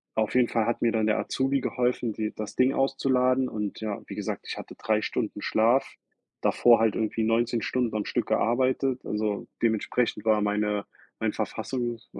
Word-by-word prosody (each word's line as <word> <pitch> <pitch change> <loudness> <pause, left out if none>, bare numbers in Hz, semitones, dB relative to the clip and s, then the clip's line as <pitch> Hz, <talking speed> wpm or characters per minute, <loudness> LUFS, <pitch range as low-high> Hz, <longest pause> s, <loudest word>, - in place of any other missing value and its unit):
auf 110 -1 0
jeden 125 -1 +5
Fall 115 -2 +1
hat 120 - -1
mir 115 -1 +3
dann 110 -1 +1
der 110 - +2
Azubi 135 +1 0
geholfen, 125 -2 0
die 110 0 -3
das 110 -1 -6
Ding 130 +1 +3
auszuladen 130 -1 +2
und 105 -2 -4
ja, 105 -2 -3
wie - - -7
gesagt, - - -4
ich - - -4
hatte - - -9
3 110 -1 +1
Stunden 110 -3 -3
Schlaf, 115 +6 +2 0.5
davor 120 -1 +5
halt 110 -2 +2
irgendwie 110 0 -1
19 115 +1 +1
Stunden 120 -3 -1
am 105 - -1
Stück - - -1
gearbeitet, 130 +2 +1
also, 105 -1 -2
dementsprechend 115 0 0
war 110 -1 +3
meine 105 0 0 0.4
mein - - 0
Verfassungs 120 -3 -3
115 Hz, 175 wpm, -27 LUFS, 110-125 Hz, 0.5 s, jeden